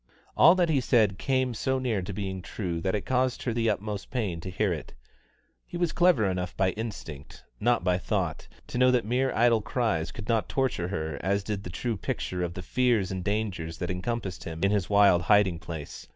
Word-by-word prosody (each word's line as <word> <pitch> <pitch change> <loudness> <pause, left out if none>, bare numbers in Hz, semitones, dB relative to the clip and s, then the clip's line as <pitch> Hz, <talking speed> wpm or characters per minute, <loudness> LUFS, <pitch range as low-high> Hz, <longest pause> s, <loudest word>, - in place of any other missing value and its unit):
All 175 - +7
that 175 -2 +2
he 140 -4 +2
said 110 -6 +2
came 130 -2 +1
so 130 +4 0
near 120 -6 -1
to 90 - -5
being 95 -1 -4
true 90 -2 -4
that 95 +3 0
it 105 - -3
caused 130 -1 0
her 120 - -1
the 115 -1 +1
utmost 105 -1 -3
pain 100 -10 -2
to 95 - -6
hear 95 +1 0
it. 75 -6 -8 0.7
He 175 - -6
was 175 -2 +1
clever 175 -11 +4
enough 90 -2 -2
by 95 -1 +2
instinct, 95 -11 -7 0.2
not 120 -2 +2
by 90 0 +2
thought, - - -2 0.2
to 125 - -4
know 125 0 +6
that 125 -3 +2
mere 130 +4 +1
idle 115 -1 +4
cries 105 -9 -1
could 105 -2 -8
not 115 -2 +1
torture 130 -10 0
her 80 -5 -3
as 100 +2 0
did 105 -1 -3
the - - -7
true 115 +5 -3
picture 90 -1 -3
of 85 -1 -3
the 90 - -6
fears 115 -4 +1
and 95 -1 -3
dangers 100 -6 -2
that 90 0 -3
encompassed 95 +1 -3
him 80 0 -6
in 100 - +3
his 100 -4 0
wild 100 -4 +5
hiding 95 -2 +3
place. 80 -3 -8
100 Hz, 210 wpm, -27 LUFS, 90-120 Hz, 0.7 s, All